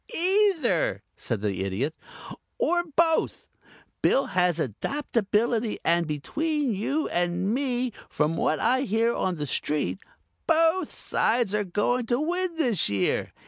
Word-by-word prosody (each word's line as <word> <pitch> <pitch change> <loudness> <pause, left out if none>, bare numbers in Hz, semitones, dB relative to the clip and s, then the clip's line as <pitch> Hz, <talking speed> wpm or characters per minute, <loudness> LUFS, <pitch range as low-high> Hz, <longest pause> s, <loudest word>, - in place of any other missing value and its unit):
"Either," 400 +6 +2
said 115 -5 -4
the 100 -3 -1
Idiot. 105 +11 -2 0.6
"Or 350 -8 +1
both. 325 -1 +1 0.5
Bill 275 - +3
has 180 -2 +1
adaptability 225 - -1
and, 170 -1 +2
between 290 - -1
you 280 +10 -1
and 175 +3 0
me, 250 -2 -1 0.2
from 155 +2 0
what 155 - 0
I 255 +3 +2
hear 230 -1 +1
on 185 -5 -1
the 150 -2 -3
street 150 +6 -1 0.5
both 330 +1 +3
sides 225 -3 0
are 210 0 +1
going 215 +6 0
to 240 +1 +1
win 350 +3 -1
this 240 - +1
year. 100 -2 0
230 Hz, 130 wpm, -26 LUFS, -, 0.6 s, Bill